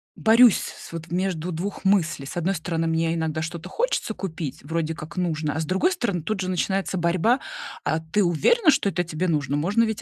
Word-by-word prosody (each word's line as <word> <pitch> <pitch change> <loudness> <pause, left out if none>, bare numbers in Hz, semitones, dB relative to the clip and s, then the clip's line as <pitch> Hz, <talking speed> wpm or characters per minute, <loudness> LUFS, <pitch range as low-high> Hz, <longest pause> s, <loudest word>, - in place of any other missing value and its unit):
борюсь 230 0 +6
с - - -7
с - - -11
вот 165 0 -7
между 180 -1 -1
2 185 +7 -4
мыслей. 180 -8 +2
С 140 - -7
одной 185 +3 0
стороны, 165 0 -2
мне 165 0 +1
иногда 160 -1 -1
что-то 170 +2 -5
хочется 485 - -1
купить, 160 -8 -5
вроде 165 +1 -2
как 155 +4 -9
нужно, 155 -4 -1
а, - - -1
с 160 - -1
другой 190 - +2
стороны, 235 - -1
тут 215 +1 -2
же 185 - -2
начинается 190 +1 -1
борьба: 180 +9 +2 0.4
а 155 - 0
ты 165 +6 0
уверена, 310 - +4
что 265 -7 +1
это 175 -2 -1
тебе 170 +2 -2
нужно? 145 -3 0
Можно 200 +9 +2
ведь 220 -2 -2
175 Hz, 210 wpm, -24 LUFS, 160-195 Hz, 0.4 s, борюсь